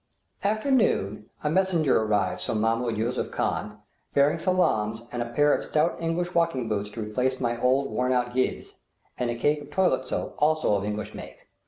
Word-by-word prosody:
After 215 +7 0
noon 105 - +1
a 150 - +1
messenger 170 -8 +2
arrives 105 -4 0
from 110 - -1
Mahmoud 115 +1 0
Yusuph 115 +3 -1
Khan - - -2 0.4
bringing 145 +4 +4
salaams 115 - +1
and 120 - -3
a 120 - -3
pair 145 +5 +3
of - - 0
stout 155 +2 +1
English 175 +2 -1
walking 165 -8 +1
boots 105 -1 -2
to 115 - -7
replace 125 +5 -1
my 120 -1 -1
old 130 +2 +2
worn 125 +1 0
out 125 -1 0
geivehs; 130 0 -1 0.4
and 125 - 0
a 120 - -1
cake 145 +5 +1
of 145 - -11
toilet 160 -5 +1
soap, - - -3
also 155 -5 +2
of 100 0 0
English 105 0 -4
make. - - -10
125 Hz, 185 wpm, -26 LUFS, 110-155 Hz, 0.4 s, bringing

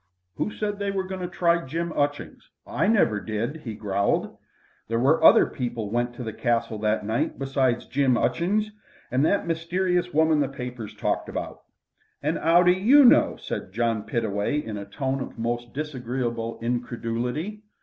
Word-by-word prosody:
"Who - - -1
said 210 0 -3
as 205 - -13
they 200 0 -1
were 195 -1 -1
goin' 190 0 -6
to 180 - -2
try 170 -1 +1
Jim 165 +4 -3
'Utchings? 145 0 -2 0.2
I - - 0
never 200 - +3
did," 115 +9 -3
he 115 -8 -7
growled. 100 -1 -1 0.5
"There 115 - -1
was 135 +7 +3
other - - +8
people 120 -5 -4
went 120 +1 -1
to 125 - -6
the 110 -2 -5
Castle 115 -1 -1
that 105 0 0
night 110 +2 -1
besides 135 -3 0
Jim 135 -3 +2
'Utchings, 185 - 0 0.4
and 130 +3 +2
that 200 +6 +2
mysterierse 180 +2 0
woman 160 -1 +3
the 140 -2 +1
papers 125 -5 -7
talked - - -1
about." - - -5 0.6
"An' - - 0
'ow 170 +2 +5
do 180 - +6
you 240 +10 +6
know?" 245 - +6
said 95 - -6
John 115 -1 0
Pittaway 105 +4 -1
in 115 -7 -4
a 100 -1 -6
tone 135 +6 -3
of - - -7
most 120 +1 -3
disagreeable 125 -5 -3
incredulity. 120 - -3
130 Hz, 170 wpm, -25 LUFS, 115-170 Hz, 0.6 s, other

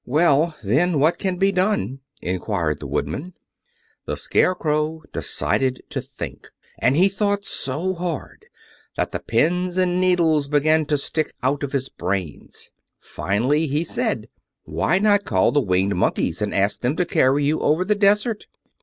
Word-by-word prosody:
"Well, 155 +2 +3
then, 145 - +2
what 155 +4 +3
can 190 -2 -1
be 195 +2 +3
done?" 180 - 0 0.2
inquired 90 -3 -1
the - - -6
Woodman. 140 - -3 0.7
The - - -3
Scarecrow 155 -2 0
decided 130 -1 0
to - - -2
think, - - -8 0.3
and 130 - +3
he 185 +3 +6
thought 200 0 -1
so 155 +8 -2
hard 170 -5 -5 0.5
that - - -1
the - - -3
pins 180 +9 0
and 180 -1 +2
needles 165 -5 +3
began 155 +1 +2
to 150 - +2
stick 155 +2 -2
out 135 +2 +1
of 140 -2 -3
his 135 -2 -1
brains. 90 - -4 0.3
Finally 130 +11 0
he 150 +3 0
said: 170 - -2 0.4
"Why 80 - 0
not 205 0 +3
call - - +2
the 145 - +3
Winged 95 -2 +1
Monkeys, 90 0 0
and 105 - -1
ask 100 +1 +1
them 125 +4 0
to 180 - +1
carry 140 -3 +2
you 155 +2 +1
over 160 +5 +2
the 210 - +3
desert?" 210 +2 +2
155 Hz, 155 wpm, -22 LUFS, 130-180 Hz, 0.7 s, he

